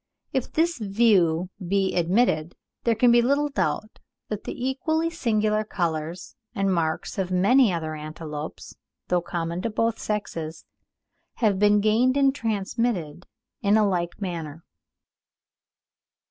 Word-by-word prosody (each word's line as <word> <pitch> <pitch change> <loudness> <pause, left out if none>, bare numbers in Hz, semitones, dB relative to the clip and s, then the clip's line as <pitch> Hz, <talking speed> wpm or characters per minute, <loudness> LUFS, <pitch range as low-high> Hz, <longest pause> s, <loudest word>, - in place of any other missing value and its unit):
If 265 -3 -1
this 335 -2 +1
view 195 -5 +2
be 195 +1 0
admitted, 175 -2 +1 0.3
there 230 -1 +3
can 240 +2 +5
be 240 0 +6
little 280 +4 +2
doubt 190 - -2 0.3
that 210 -1 -4
the 255 - -3
equally 315 +5 0
singular 215 -8 +1
colours 170 -3 -3 0.2
and 195 -1 +1
marks 170 +3 -1
of 185 -2 -1
many 205 +6 +4
other 160 -2 -3
antelopes, 155 0 -7 0.4
though 180 -1 +2
common 170 0 -3
to 230 - -1
both 225 +1 0
sexes, 165 -7 -4 0.7
have 210 -5 +1
been 210 0 +4
gained 235 +5 +3
and 275 -1 +4
transmitted 210 - -2 0.3
in 205 +1 +4
a 215 -1 +4
like 175 -3 -2
manner. 165 -5 -5
200 Hz, 130 wpm, -25 LUFS, 170-230 Hz, 0.7 s, be